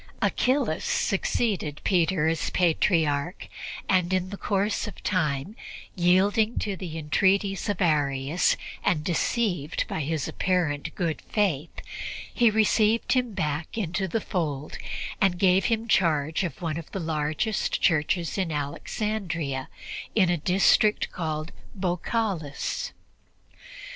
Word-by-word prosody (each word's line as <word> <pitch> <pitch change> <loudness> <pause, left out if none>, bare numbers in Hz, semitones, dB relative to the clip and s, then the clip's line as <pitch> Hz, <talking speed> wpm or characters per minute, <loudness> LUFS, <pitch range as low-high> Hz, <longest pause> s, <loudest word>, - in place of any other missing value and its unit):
Achillas 255 - +1
succeeded 190 -6 0
Peter 175 -3 +2
as 165 0 0
Patriarch, 165 -2 +1 0.4
and 185 -2 +2
in 185 0 0
course 200 +2 -1
of 210 - -9
time, 155 0 0 0.4
yielding 200 +5 +3
to 200 -2 -1
the 170 -3 -6
entreaties 195 +6 +1
of 200 -2 -1
Arius 145 0 +2 0.3
and 150 -3 +1
deceived 175 - 0
by - - -3
his 155 0 -1
apparent 165 -7 -1
good 165 -3 -1
faith, 175 -8 0 0.6
he 240 -2 +5
received 220 +1 +3
him 250 -4 0
back 150 +5 -2
into 190 -1 -1
the 225 - 0
fold 150 -7 -3 0.4
and 190 -2 +3
gave 190 +1 +4
him 225 -1 0
charge 160 -5 +2
of 175 0 -5
one 160 -2 -1
of 165 - -11
the 195 - -3
largest 160 +5 -1
churches 165 +1 +1
in 180 -4 0
Alexandria 155 -1 -3 0.5
in 185 -5 +4
a 175 - +1
district 195 +5 +3
called 155 -2 -3 0.2
Baukalis. 190 - -2
180 Hz, 120 wpm, -26 LUFS, 155-200 Hz, 0.6 s, he